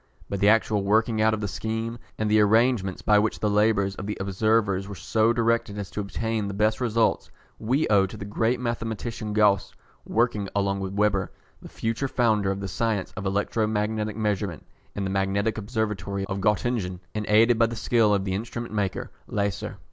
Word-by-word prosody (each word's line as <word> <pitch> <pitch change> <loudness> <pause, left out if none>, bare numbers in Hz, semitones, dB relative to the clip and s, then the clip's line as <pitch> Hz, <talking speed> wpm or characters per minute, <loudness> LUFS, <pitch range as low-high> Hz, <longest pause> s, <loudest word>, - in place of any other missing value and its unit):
But 100 - -3
the 100 +1 +5
actual 110 -1 +3
working 110 +2 +2
out 110 0 +3
of 110 - -7
the 105 - -1
scheme, 110 +3 -4 0.2
and 110 - -1
the 105 +1 +4
arrangements 110 -2 +2
by 105 -1 +5
which 110 +1 0
the 105 - 0
labours 105 -2 +2
of 100 0 -7
the 105 - -3
observers 100 0 +1
were 100 - -7
so 110 +4 +1
directed 115 -3 0
as 100 -2 -5
to - - -5
obtain 110 +1 -2
the 100 - -5
best 110 +3 +1
results, 115 -2 +1 0.3
we 130 +7 +1
owe 100 -2 +4
to 105 - -10
the 100 - -6
great 115 +4 0
mathematician 115 -2 -3
Gauss, 105 -2 +2 0.3
working 110 -4 0
along 100 -1 0
with 95 -1 -4
Weber, 100 -2 +1 0.3
the - - -11
future 115 +4 -2
founder 110 -6 +1
of 95 0 -2
the 100 - -3
science 105 0 -2
of 95 +1 -3
electro 105 +3 0
magnetic 105 0 -1
measurement, 100 -6 -2 0.3
in 100 - -2
the 95 - -2
magnetic 100 +3 0
observatory 105 -3 -2
of 100 0 -4
Gottingen, 105 -3 0
and 105 -1 -3
aided 115 +2 +5
by 115 - +5
the 115 - -5
skill 110 -1 +2
of 100 -1 +1
the 95 - -1
instrument 115 +3 -5
maker 100 -3 -2 0.2
Leyser. 100 -2 -2
105 Hz, 195 wpm, -25 LUFS, 100-115 Hz, 0.3 s, the